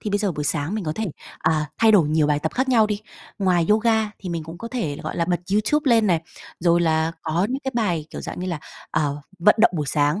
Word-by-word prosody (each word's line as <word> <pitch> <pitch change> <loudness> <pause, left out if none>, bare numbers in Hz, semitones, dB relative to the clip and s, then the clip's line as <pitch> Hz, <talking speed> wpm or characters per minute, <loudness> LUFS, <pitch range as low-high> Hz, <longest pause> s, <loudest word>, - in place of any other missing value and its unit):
thì 210 - -4
bây 205 - +1
giờ 205 -3 0
buổi 150 -1 -4
sáng 145 +5 -1
mình 215 -3 -3
có 155 - -1
thể, 220 - -2 0.3
à, 155 -1 +1
thay 225 -1 +5
đổi 175 -8 +5
nhiều 155 0 +2
bài 145 -1 +2
tập 160 +2 -3
khác 260 +1 0
nhau 230 -4 +5
đi. 210 -1 -3 0.4
Ngoài 180 -4 +2
yoga 220 0 +3
thì 190 - -7
mình 170 -2 -3
cũng 165 +2 -9
có 230 - -6
thể 180 - -3
là, - - -10
gọi - - -5
là, 170 - +1
bật 175 0 0
YouTube 255 +7 +2
lên 225 -2 +4
này, 170 -4 +2 0.4
rồi 170 0 +3
là 160 -1 +1
có 165 +4 0
những 265 +2 -2
cái 265 - -1
bài, 175 -10 0
kiểu, - - -7
dạng - - -6
như 185 - -3
là, 170 -4 -2 0.3
ờ, 150 -2 -1 0.2
vận 210 +5 +5
động 225 - +6
buổi 150 -2 -2
sáng, 150 +5 +1
175 Hz, 270 wpm, -23 LUFS, 160-215 Hz, 0.4 s, động